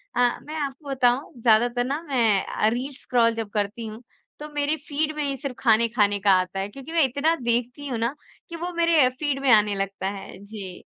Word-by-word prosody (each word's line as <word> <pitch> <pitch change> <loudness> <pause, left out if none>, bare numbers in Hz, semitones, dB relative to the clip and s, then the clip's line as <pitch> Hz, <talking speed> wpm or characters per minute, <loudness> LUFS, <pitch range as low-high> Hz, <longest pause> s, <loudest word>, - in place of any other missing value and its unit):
अ, 245 -1 +2
मैं 305 - -8
आपको 275 +1 -9
बताऊँ 260 +2 +1
ज़्यादातर 240 +2 +3
ना 280 +4 -2
मैं 225 -7 +3
अ, 215 - 0
रील 250 +5 -3
स्क्रोल 235 -2 +2
जब 225 -2 -4
करती 210 +2 -2
हूँ 220 +3 -9 0.4
तो 300 - -6
मेरे 290 +1 +1
फ़ीड 305 +1 -2
में 300 - -2
ही 275 -1 -1
सिर्फ़ 275 -2 -5
ख़ाने 230 -1 +4
ख़ाने 205 -3 +2
का 200 0 +3
आता 185 +1 -3
है 195 - -2
क्योंकि 270 +7 -10
मैं 330 -3 +4
इतना 285 +6 +1
देखती 245 +4 -1
हूँ 250 -4 -2
ना 235 +5 -1 0.3
कि 335 - -6
वो 345 +2 -4
मेरे 335 -2 +3
अ, - - +3
फ़ीड 275 +2 -2
में 270 -2 +3
आने 210 -2 +5
लगता 195 -1 -2
है। 195 -1 -8
जी। 200 -3 -7
245 Hz, 220 wpm, -24 LUFS, 215-285 Hz, 0.4 s, आने